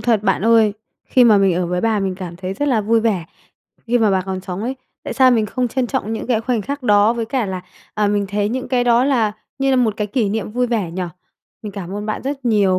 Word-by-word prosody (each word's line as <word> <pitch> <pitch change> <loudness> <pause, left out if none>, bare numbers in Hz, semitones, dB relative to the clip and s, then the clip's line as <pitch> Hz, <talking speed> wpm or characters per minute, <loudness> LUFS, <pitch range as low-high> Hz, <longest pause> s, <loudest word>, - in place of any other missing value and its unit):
thật 225 -4 +1
bạn 195 -2 +1
ơi. 225 -2 +5 0.3
Khi 250 -1 +4
mà 215 -3 +6
mình 195 -2 +3
ở 180 0 0
với 180 +1 -1
bà 220 -1 +1
mình 190 -1 -1
cảm 180 -2 -7
thấy 185 +1 -5
rất 290 +7 -1
là 240 -5 +2
vui 225 +2 +2
vẻ 205 -7 0 0.6
khi 240 +1 +2
mà 215 -3 +3
bà 190 -1 +2
còn 190 0 -4
sống 185 +2 -5
ấy. 260 +3 -3 0.3
Tại - - -4
sao 260 -1 +5
mình 225 -3 +2
không 250 +3 -1
trân 255 +1 -1
trọng 225 -4 -2
những 220 - -4
cái 235 -3 +1
khoảnh 230 -2 -1
khắc 280 +2 -5
đó 210 -1 +4
với 235 -1 -2
cả 245 -3 -1
là, 185 -1 -4 0.3
à, 210 -1 +1
mình 205 -1 0
thấy 205 +1 0
những 255 +2 -3
cái 245 -1 +1
đó 240 +1 +4
là 235 -7 +2 0.3
như 270 0 +1
là 260 - +3
một 230 -5 +2
cái 210 - -1
kỷ 220 0 0
niệm 215 +1 -3
vui 250 +2 +1
vẻ 220 -8 -1
nhỉ? 185 +2 -4 0.6
Mình 210 -2 -6
cảm 195 -1 -6
ơn 210 +1 -4
bạn 215 - -3
rất 270 -1 -4
nhiều 200 -5 +3
220 Hz, 270 wpm, -19 LUFS, 195-245 Hz, 0.6 s, mà